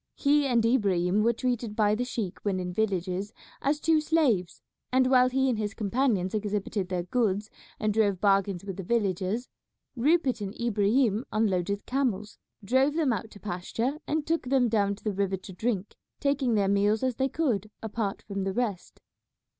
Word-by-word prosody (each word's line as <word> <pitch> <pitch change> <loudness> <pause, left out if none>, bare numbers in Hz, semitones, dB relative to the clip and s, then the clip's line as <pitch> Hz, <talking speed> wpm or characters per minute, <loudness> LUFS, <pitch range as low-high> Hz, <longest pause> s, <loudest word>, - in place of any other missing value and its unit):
He 290 0 +3
and 235 -3 +2
Ibrahim 200 -5 +2
were 230 +2 +4
treated 235 -2 -2
by 210 -2 +3
the 245 +3 -1
sheik 220 -7 -4
when 195 -3 -1
in 180 0 -3
the - - -6
villages 195 0 -1 0.3
as 295 +2 +1
two 320 0 +3
slaves, 270 - +1 0.3
and 260 0 +4
while 255 -1 +6
he 265 +1 +1
and 240 -4 0
his 210 0 -3
companions 210 -3 0
exhibited 205 -2 -2
their 180 -2 -1
goods 210 -1 0 0.3
and 215 -1 0
drove 205 -4 +2
bargains 195 -2 +2
with 195 -3 -5
the 195 - -5
villagers, 200 +2 -1 0.5
Rupert 270 -2 +2
and 200 +1 -6
Ibrahim 225 0 +2
unloaded 200 -2 0
the - - -46
camels, 230 -6 -2 0.3
drove 265 +7 +3
them 305 -7 +2
out 220 +1 -4
to 205 - -14
pasture, 215 +9 -3
and 305 0 -1
took 330 -3 0
them 260 -3 +3
down 200 -2 +1
to 200 - -20
the 210 - -1
river 195 0 0
to 190 +1 -11
drink, 205 0 -2 0.2
taking 280 -4 +1
their 200 -2 +2
meals 205 +3 +2
as 255 -3 0
they 265 0 +1
could 235 - -1
apart 215 -2 -3
from 200 -2 -4
the 190 0 -2
rest. 220 -6 -3
215 Hz, 185 wpm, -28 LUFS, 195-255 Hz, 0.5 s, while